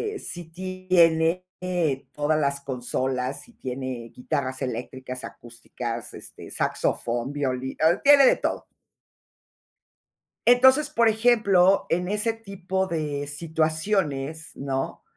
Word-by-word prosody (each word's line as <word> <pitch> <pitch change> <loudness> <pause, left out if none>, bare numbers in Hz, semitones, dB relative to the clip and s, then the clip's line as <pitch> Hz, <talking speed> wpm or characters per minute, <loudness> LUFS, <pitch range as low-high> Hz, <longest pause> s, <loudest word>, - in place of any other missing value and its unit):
eh, - - -5
sí 175 -1 -5
tiene, 180 -2 +2 0.2
eh, 175 -7 -1
todas 150 +1 +1
las 140 -1 0
consolas, 130 0 -2
si 240 - -15
tiene 130 - -5
guitarras 130 0 -3
eléctricas, 130 +1 -5
acústicas, 120 0 -7
este, - - -10
saxofón, 120 +3 -1
violí 130 -2 -2
eh, 160 +3 +4
tiene 285 -1 +8
de - - +5
todo. - - -3 1.8
Entonces, 260 +5 +6
por 235 -6 +3
ejemplo, 215 -5 +4
en 180 +2 0
ese 210 +3 0
tipo 190 -3 -3
de 150 -5 -3
situaciones, 155 0 -1
¿no? 135 -1 -3
155 Hz, 110 wpm, -25 LUFS, 130-190 Hz, 1.8 s, tiene